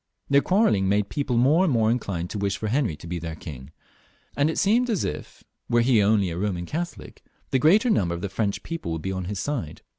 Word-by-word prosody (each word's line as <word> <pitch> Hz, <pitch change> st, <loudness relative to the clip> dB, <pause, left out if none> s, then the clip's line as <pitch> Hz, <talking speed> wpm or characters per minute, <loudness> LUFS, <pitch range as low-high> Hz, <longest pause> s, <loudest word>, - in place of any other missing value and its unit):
Their 140 Hz, 0 st, +6 dB
quarrelling 160 Hz, -, +2 dB
made 100 Hz, 0 st, +1 dB
people 140 Hz, -4 st, -1 dB
more 145 Hz, +9 st, +4 dB
and 180 Hz, -, +2 dB
more 110 Hz, -3 st, +3 dB
inclined 95 Hz, -8 st, -3 dB
to 105 Hz, -, -4 dB
wish 100 Hz, -1 st, -1 dB
for 110 Hz, -, -3 dB
Henry 120 Hz, -, 0 dB
to 75 Hz, -, -13 dB
be 85 Hz, +1 st, -4 dB
their 80 Hz, -1 st, -6 dB
king, 70 Hz, -5 st, -9 dB, 0.7 s
and 145 Hz, +2 st, +2 dB
it 160 Hz, -, -3 dB
seemed 240 Hz, +5 st, +2 dB
as 215 Hz, -6 st, 0 dB
it 75 Hz, -, -4 dB, 0.4 s
were 120 Hz, 0 st, +3 dB
he 115 Hz, -3 st, +4 dB
only 100 Hz, -3 st, +2 dB
a 85 Hz, -, -5 dB
Boman 90 Hz, -3 st, -2 dB
Catholic, 170 Hz, -, -6 dB, 0.3 s
the 130 Hz, -, +2 dB
greater 205 Hz, -, +4 dB
number 85 Hz, -, +1 dB
of 85 Hz, -, -7 dB
the 100 Hz, -, -2 dB
French 100 Hz, +1 st, -2 dB
people 165 Hz, -, -5 dB
would 80 Hz, -, -5 dB
be 95 Hz, -, -2 dB
on 95 Hz, -1 st, -4 dB
his 100 Hz, +1 st, -4 dB
side. 115 Hz, -, -4 dB
105 Hz, 235 wpm, -25 LUFS, 90-145 Hz, 0.7 s, Their